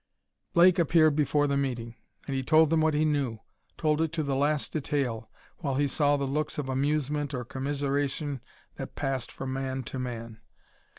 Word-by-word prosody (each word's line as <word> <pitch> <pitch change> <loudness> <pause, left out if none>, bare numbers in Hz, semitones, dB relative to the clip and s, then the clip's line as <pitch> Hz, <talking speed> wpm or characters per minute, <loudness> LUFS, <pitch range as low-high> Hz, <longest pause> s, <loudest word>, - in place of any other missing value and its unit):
Blake 175 +1 +6
appeared 155 -2 +4
before 145 0 +2
the 140 -1 +1
meeting, 120 -4 -2 0.3
and 135 - -3
he 135 - 0
told 155 +3 +4
them 165 -1 +3
what 155 -1 +2
he 155 +1 +3
knew 140 -7 0 0.4
told 155 -1 +1
it 160 -2 0
to 160 -2 -1
the 140 -2 -1
last 145 +2 0
detail, 130 -7 -2 0.3
while 140 -6 -2
he 145 +2 +2
saw 145 +1 +2
the 140 - -1
looks 150 +3 -2
of 145 -3 -2
amusement 145 +1 0
or 125 -1 -4
commiseration 140 +1 -2 0.4
that - - -7
passed 135 -3 -2
from 130 -1 -5
man 130 0 -3
to 130 +3 -6
man. 115 -3 -5
140 Hz, 180 wpm, -28 LUFS, 130-150 Hz, 0.4 s, Blake